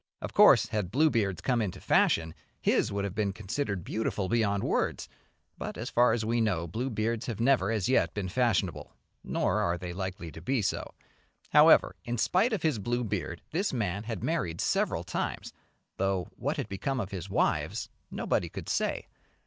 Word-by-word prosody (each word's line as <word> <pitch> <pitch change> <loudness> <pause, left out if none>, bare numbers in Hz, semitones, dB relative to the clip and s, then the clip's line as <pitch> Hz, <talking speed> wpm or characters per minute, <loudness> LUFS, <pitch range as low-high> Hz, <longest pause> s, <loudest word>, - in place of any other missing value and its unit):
Of - - -6
course - - +7
had 105 -5 -2
blue 150 +8 +3
beards 100 -6 0
come 125 -3 +1
into 100 -5 -3
fashion 80 -1 +2 0.3
his - - +2
would 100 0 -2
have 100 -2 -3
been 105 -1 0
considered 100 - -3
beautiful 105 -2 -2
beyond 100 -2 +1
words, - - 0 0.5
but, - - -5
as - - -5
far 120 0 +4
as 110 -1 0
we 115 +1 +1
know, 95 -7 0
blue 115 +10 -3
beards 115 +1 -2
have 115 -4 -4
never 120 -5 +3
as 110 -5 0
yet 90 -10 +2
been 100 -3 -2
fashionable, 115 -2 0 0.3
nor - - 0
are 85 0 0
they 90 0 -6
likely 95 -3 -5
to 80 - -10
be 120 +5 0
so. 95 - -2 0.6
However, - - +6
in 120 0 -3
spite 190 - +2
of 210 -7 -2
his 155 -9 +1
blue 120 +4 -1
beard 85 -6 -4
this 190 +6 0
man 105 -4 -2
had 115 -1 -4
married 85 - -1
several - - 0
times, - - -4 0.4
though 95 -2 0
what - - -2
had - - -3
become 130 +8 -2
of 100 -4 -4
his 95 -1 -6
wives 95 - 0 0.2
nobody - - -1
could - - -7
say. - - -1
105 Hz, 185 wpm, -29 LUFS, 95-120 Hz, 0.6 s, course